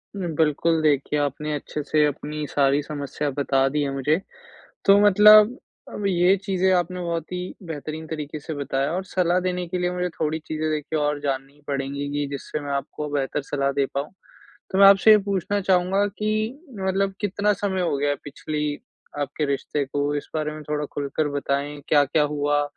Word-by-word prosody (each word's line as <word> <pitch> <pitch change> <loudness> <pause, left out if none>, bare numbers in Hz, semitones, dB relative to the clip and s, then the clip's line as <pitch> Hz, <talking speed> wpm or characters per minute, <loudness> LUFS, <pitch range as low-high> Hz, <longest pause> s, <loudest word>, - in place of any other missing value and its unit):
बिल्कुल, 160 -2 +1
देखिए 150 -1 +1
आपने 145 +1 -2
अच्छे 150 +1 -4
से 150 +1 +2
अपनी 150 +1 -3
सारी 140 0 +2
समस्या 145 0 -4
बता 135 -1 +1
दी 150 +2 -1
है 140 - -1
मुझे। 145 +4 +1 0.7
तो 200 +1 +7
मतलब 210 +4 +7 0.3
अब 205 - -5
ये 180 +1 +4
चीज़ें 190 -1 0
आपने 180 0 -1
बहुत 170 -1 -3
ही 180 0 -4
बेहतरीन 155 0 -6
तरीके 155 -1 -5
से 160 - -6
बताया 140 0 -1
और 185 +2 -2
सलाह 180 -1 +1
देने 180 -1 -2
के 180 +2 -2
लिए 180 0 0
मुझे 180 0 -1
थोड़ी 155 0 0
चीज़ें 155 0 -2
देखिए 155 +1 -2
और 145 0 0
जाननी 135 -1 -3
ही 145 - -24
पड़ेगी 140 0 -3
की 145 0 -1
जिससे 140 +2 -5
मैं 145 -1 -5
आपको 140 +2 -3
बेहतर 140 0 -1
सलाह 140 0 -1
दे 140 0 +1
पाऊँ। 140 +4 -3 0.6
तो 190 - 0
मैं 200 - +9
आपसे 195 +2 +7
ये 215 - +9
पूछना 200 0 -1
चाहूँगा 190 +1 +2
कि 215 +4 -1 0.2
मतलब 195 +1 0
कितना 205 +1 +1
समय 195 -2 -2
हो 170 -5 0
गया 145 +1 0
है 145 - 0
पिछली 150 +1 -3 0.4
आपके 145 +1 -2
रिश्ते 140 +1 -1
को 145 +2 -1
इस 145 - -5
बारे 155 -1 -1
में 155 0 -8
थोड़ा 150 0 -1
खुलकर 145 +1 -1
बताएँ? 145 0 -2
क्या-क्या 145 0 +3
हुआ? 145 0 +1
150 Hz, 185 wpm, -24 LUFS, 145-180 Hz, 0.7 s, मैं